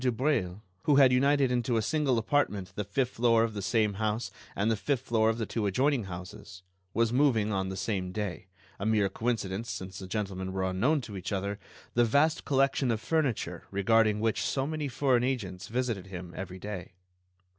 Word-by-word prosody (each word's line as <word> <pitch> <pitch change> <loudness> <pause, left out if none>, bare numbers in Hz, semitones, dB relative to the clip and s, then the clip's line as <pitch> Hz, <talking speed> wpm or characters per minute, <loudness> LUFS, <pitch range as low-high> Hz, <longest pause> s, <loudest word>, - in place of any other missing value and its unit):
Dubreuil, 120 -6 0 0.2
who 145 - +4
had 135 -2 +7
united 140 0 +3
into 120 -1 +1
a - - +2
single 145 -2 +1
apartment 110 -6 0
the 105 - -3
fifth 125 +6 -1
floor 115 -1 +3
of 115 -1 -1
the 100 - -4
same 105 +2 +1
house 110 -1 -1 0.2
and 105 +3 +1
the - - +2
fifth 130 +4 -1
floor 110 -3 +2
of 115 - 0
the 115 - -1
two 105 -2 -1
adjoining 130 +3 +1
houses, 90 +1 -9 0.3
was 115 0 +2
moving 120 -6 +3
on 95 -1 -1
the 95 - -5
same 95 -3 -2
day—a 95 0 -7
mere 105 -3 +3
coincidence, 110 -1 -2
since 95 0 -6
the 95 - -7
gentlemen 95 -2 -3
were 95 0 -1
unknown 125 +12 +1
to 110 -4 -8
each 95 +1 -5
other—the 100 +4 -2
vast 150 +7 +2
collection 135 -1 +2
of 115 -2 +1
furniture 140 0 -1
regarding 105 +2 +3
which 110 0 0
so 135 -1 0
many 155 0 -2
foreign 130 -2 +2
agents 100 -8 -2
visited 115 -5 -2
him 90 -2 -8
every 95 -1 -6
day. 95 -2 -7
110 Hz, 185 wpm, -29 LUFS, 95-125 Hz, 0.3 s, had